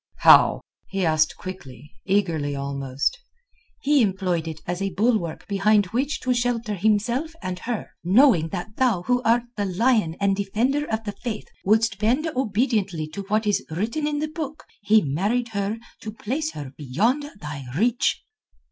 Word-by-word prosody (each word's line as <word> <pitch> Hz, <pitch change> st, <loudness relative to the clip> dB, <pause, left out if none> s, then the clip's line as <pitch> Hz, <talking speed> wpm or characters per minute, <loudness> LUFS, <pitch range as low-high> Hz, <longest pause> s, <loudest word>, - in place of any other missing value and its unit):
"How?" -, -, +7 dB, 0.3 s
he 195 Hz, -2 st, -1 dB
asked 155 Hz, -1 st, +2 dB
quickly, 150 Hz, -7 st, -9 dB
eagerly 170 Hz, -8 st, 0 dB
almost. 140 Hz, -, -2 dB, 0.6 s
"He 290 Hz, -1 st, +4 dB
employed 185 Hz, -5 st, 0 dB
it 160 Hz, -1 st, -5 dB
as 175 Hz, +2 st, -3 dB
a 195 Hz, -, 0 dB
bulwark 195 Hz, -3 st, 0 dB
behind 205 Hz, +1 st, +3 dB
which 275 Hz, +5 st, 0 dB
to 255 Hz, -, +1 dB
shelter 235 Hz, -3 st, -1 dB
himself 220 Hz, -, 0 dB
and 180 Hz, -1 st, -4 dB
her. 230 Hz, +2 st, -4 dB
Knowing 190 Hz, -, +5 dB
that 180 Hz, +7 st, -6 dB
thou 235 Hz, -9 st, +2 dB
who 250 Hz, +3 st, +1 dB
art 235 Hz, 0 st, +3 dB
the 205 Hz, -, 0 dB
Lion 200 Hz, -3 st, +2 dB
and 200 Hz, -1 st, +2 dB
defender 235 Hz, +9 st, 0 dB
of 220 Hz, 0 st, -1 dB
the 205 Hz, -, -3 dB
Faith 215 Hz, 0 st, -6 dB, 0.2 s
wouldst 220 Hz, 0 st, +2 dB
bend 245 Hz, +9 st, +2 dB
obediently 210 Hz, -, 0 dB
to 200 Hz, -, -6 dB
what 215 Hz, +2 st, +1 dB
is 205 Hz, -1 st, +1 dB
written 225 Hz, -, -2 dB
in 295 Hz, -1 st, -1 dB
the 305 Hz, +1 st, -1 dB
Book, 305 Hz, -1 st, -6 dB, 0.2 s
he 215 Hz, +1 st, +4 dB
married 205 Hz, -, 0 dB
her 200 Hz, 0 st, -2 dB, 0.2 s
to 215 Hz, -, -6 dB
place 275 Hz, +9 st, -3 dB
her 140 Hz, -3 st, -7 dB
beyond 195 Hz, -, 0 dB, 0.2 s
thy 150 Hz, -5 st, -7 dB
reach." 240 Hz, +5 st, +1 dB
210 Hz, 160 wpm, -24 LUFS, 175-245 Hz, 0.6 s, How